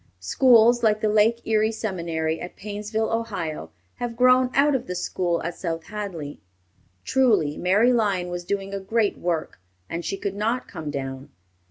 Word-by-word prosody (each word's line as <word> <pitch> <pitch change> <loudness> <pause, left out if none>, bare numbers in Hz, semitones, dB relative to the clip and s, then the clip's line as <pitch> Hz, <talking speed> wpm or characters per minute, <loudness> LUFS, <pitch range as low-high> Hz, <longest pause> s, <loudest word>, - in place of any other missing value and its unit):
Schools 240 - +5
like 215 -2 +3
the 215 - +1
Lake 220 +2 +3
Erie 220 0 +2
Seminary 170 -7 -3
at 175 - -7
Painesville, 210 +2 -3
Ohio, 190 - -3 0.3
have 240 -1 -4
grown 255 0 +5
out 285 +2 +4
of 265 - -1
the 180 - -4
school 175 -1 -1
at 170 +2 -3
South 165 -2 -4
Hadley. 175 -7 -6 0.6
Truly, 225 - +2
Mary 205 +8 +3
Lyon 200 -6 +1
was 175 0 -4
doing 195 +1 -3
a 200 - -2
great 210 +2 0
work, 170 - -2 0.3
and 170 +1 -4
she 195 - -3
could 195 0 -3
not 225 +5 -1
come 155 -2 -6
down. 135 -1 -5
200 Hz, 165 wpm, -24 LUFS, 170-225 Hz, 0.6 s, Schools